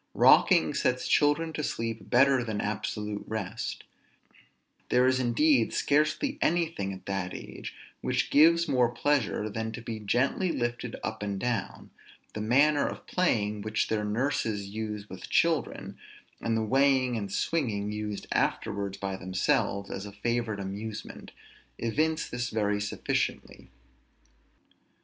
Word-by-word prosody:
Rocking -, -, +5 dB
sets 125 Hz, 0 st, 0 dB
children 150 Hz, +2 st, +2 dB
to 150 Hz, -, -3 dB
sleep 115 Hz, -4 st, -3 dB
better 135 Hz, 0 st, +4 dB
than 110 Hz, -3 st, -3 dB
absolute 105 Hz, 0 st, -3 dB
rest; 110 Hz, 0 st, -4 dB, 1.1 s
there 125 Hz, +1 st, +4 dB
is 130 Hz, 0 st, +3 dB
indeed 125 Hz, 0 st, +3 dB
scarcely 155 Hz, -, +1 dB
anything 165 Hz, -, 0 dB
at 95 Hz, -1 st, -9 dB
that 95 Hz, -2 st, -3 dB
age, -, -, -8 dB, 0.3 s
which -, -, 0 dB
gives 170 Hz, +3 st, +6 dB
more 125 Hz, -4 st, +3 dB
pleasure 120 Hz, -4 st, 0 dB
than 110 Hz, +1 st, -3 dB
to -, -, -6 dB
be 115 Hz, -1 st, -5 dB
gently 125 Hz, -, +1 dB
lifted 120 Hz, -2 st, -3 dB
up 110 Hz, -1 st, -4 dB
and 100 Hz, -1 st, -3 dB
down; 120 Hz, -4 st, -3 dB, 0.4 s
the 105 Hz, -, -4 dB
manner 140 Hz, +6 st, +3 dB
of -, -, -7 dB
playing 105 Hz, -, 0 dB
which 110 Hz, +1 st, -1 dB
their 110 Hz, -1 st, 0 dB
nurses 110 Hz, -3 st, -1 dB
use 105 Hz, 0 st, -5 dB
with 95 Hz, -2 st, -9 dB
children, 165 Hz, -6 st, 0 dB, 0.4 s
and 115 Hz, -1 st, 0 dB
the 110 Hz, -, 0 dB
weighing 130 Hz, +1 st, +3 dB
and 100 Hz, -3 st, -4 dB
swinging 105 Hz, -8 st, -1 dB
used 105 Hz, -1 st, -4 dB
afterwards 100 Hz, -1 st, -1 dB
by 100 Hz, -1 st, -3 dB
themselves 95 Hz, +1 st, 0 dB
as 100 Hz, +1 st, -5 dB
a -, -, -8 dB
favorite 115 Hz, +1 st, -2 dB
amusement, 100 Hz, +3 st, -6 dB, 0.5 s
evince 155 Hz, +7 st, 0 dB
this 120 Hz, 0 st, -3 dB
very 105 Hz, -1 st, 0 dB
sufficiently. 100 Hz, -, -3 dB
115 Hz, 135 wpm, -28 LUFS, 105-135 Hz, 1.1 s, gives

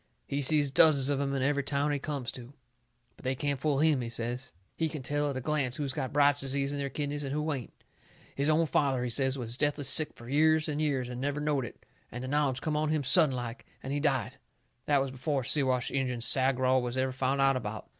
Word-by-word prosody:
He 140 Hz, +1 st, -2 dB
sees 145 Hz, 0 st, +2 dB
dozens 140 Hz, -2 st, +5 dB
of 140 Hz, -1 st, 0 dB
'em 140 Hz, 0 st, -1 dB
in 135 Hz, -, -1 dB
every 140 Hz, +1 st, +1 dB
town 140 Hz, +1 st, -1 dB
he 145 Hz, -, -1 dB
comes 140 Hz, -4 st, -4 dB
to. 125 Hz, +1 st, -10 dB, 0.6 s
But -, -, -18 dB
they 130 Hz, +1 st, -1 dB
can't 140 Hz, 0 st, -2 dB
fool 145 Hz, -1 st, 0 dB
him, 150 Hz, -2 st, +3 dB
he 120 Hz, -, -4 dB
says. 120 Hz, +2 st, -3 dB, 0.2 s
He 160 Hz, -1 st, -1 dB
can 150 Hz, -3 st, -6 dB
tell 145 Hz, +2 st, 0 dB
at 135 Hz, -, -4 dB
a -, -, -4 dB
glance 135 Hz, -3 st, -1 dB
who's 140 Hz, -2 st, -2 dB
got 130 Hz, -1 st, -3 dB
Bright's 145 Hz, -1 st, +4 dB
Disease 140 Hz, +1 st, 0 dB
in 145 Hz, -, -4 dB
their 140 Hz, 0 st, -2 dB
kidneys 145 Hz, +1 st, -3 dB
and 135 Hz, -, -4 dB
who 150 Hz, +2 st, -1 dB
ain't. 130 Hz, -4 st, -6 dB, 0.6 s
His 140 Hz, +2 st, -1 dB
own 160 Hz, +2 st, +3 dB
father, 135 Hz, -5 st, +1 dB
he 125 Hz, -, -1 dB
says, 130 Hz, +3 st, +2 dB
was 120 Hz, -1 st, -5 dB
deathly 145 Hz, 0 st, 0 dB
sick 145 Hz, +3 st, +2 dB
fur 115 Hz, -, -13 dB
years 155 Hz, +3 st, +3 dB
and 150 Hz, 0 st, -2 dB
years 135 Hz, -5 st, 0 dB
and 125 Hz, 0 st, -6 dB
never 145 Hz, +1 st, -2 dB
knowed 150 Hz, -3 st, 0 dB
it, -, -, -12 dB, 0.3 s
and 125 Hz, +2 st, -6 dB
the -, -, -5 dB
knowledge 140 Hz, -2 st, 0 dB
come 155 Hz, -1 st, -2 dB
on 155 Hz, 0 st, 0 dB
him 155 Hz, -2 st, 0 dB
sudden 145 Hz, 0 st, +5 dB
like, 120 Hz, -1 st, -6 dB, 0.2 s
and 135 Hz, -, -4 dB
he 145 Hz, -, -1 dB
died. 135 Hz, -4 st, -1 dB, 0.5 s
That 145 Hz, -2 st, +3 dB
was 135 Hz, -, -5 dB
before 135 Hz, +1 st, -2 dB
Siwash 130 Hz, -2 st, +1 dB
Injun 130 Hz, -3 st, -2 dB
Sagraw 130 Hz, +1 st, +3 dB
was 125 Hz, +1 st, -4 dB
ever 130 Hz, 0 st, 0 dB
found 135 Hz, +1 st, -1 dB
out 135 Hz, 0 st, +4 dB
about. 110 Hz, -4 st, -5 dB
140 Hz, 240 wpm, -29 LUFS, 130-145 Hz, 0.6 s, dozens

